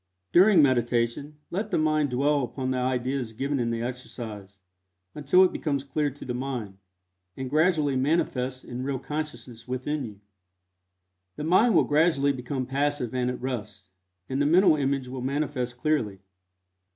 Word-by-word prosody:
During 185 -2 +7
meditation 120 +2 +1
let 205 +4 -2
the - - +1
mind 155 -2 +2
dwell 140 +3 +2
upon 130 +1 -3
the 130 - 0
ideas 125 -1 -1
given 135 +4 -2
in 120 -1 0
the 115 0 -2
exercise, 110 -5 -7 0.5
until 150 +6 +4
it 185 - +2
becomes 140 -4 -1
clear 145 +1 -1
to 140 +1 -11
the 125 - -3
mind, 120 -7 -4 0.6
and 130 -1 -5
gradually 155 -3 +2
manifests 130 -2 0
in 125 0 -6
real 135 0 -2
consciousness 145 -5 -6
within 130 +4 -2
you. 105 -4 -8 1.2
The - - -5
mind 190 +7 +4
will - - +6
gradually 150 -2 +3
become 130 0 -3
passive 140 -2 -1
and 125 -1 0
at 125 - -4
rest, 125 -7 -5 0.4
and 135 +2 -1
the 145 - +3
mental 175 +1 +5
image 135 -2 -1
will 130 0 -6
manifest 130 -2 -2
clearly. 120 -9 -1
135 Hz, 155 wpm, -26 LUFS, 125-150 Hz, 1.2 s, During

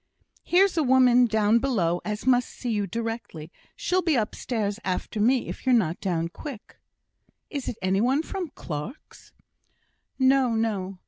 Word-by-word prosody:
"Here's 370 +1 +3
a - - +4
woman 250 -2 +5
down 220 +1 +3
below 185 -10 0
as 210 +1 -4
must 250 -1 +3
see 245 - -5
you 205 -2 -1
directly. 225 -7 -5 0.2
She'll 370 +1 0
be 330 -4 +1
upstairs 215 -2 -2
after 190 +3 -3
me 245 +4 +2
if - - -7
you're 255 -1 +4
not 175 -7 0
down 170 -4 -1
quick." 255 - -10 0.7
"Is 280 -4 -4
it 230 - -4
any 190 +2 +2
one 265 +6 +2
from 370 0 -4
Clarke's?" 160 - -8 0.9
"No, 260 -3 +3
no! 200 -4 -2
230 Hz, 150 wpm, -25 LUFS, 200-260 Hz, 0.9 s, woman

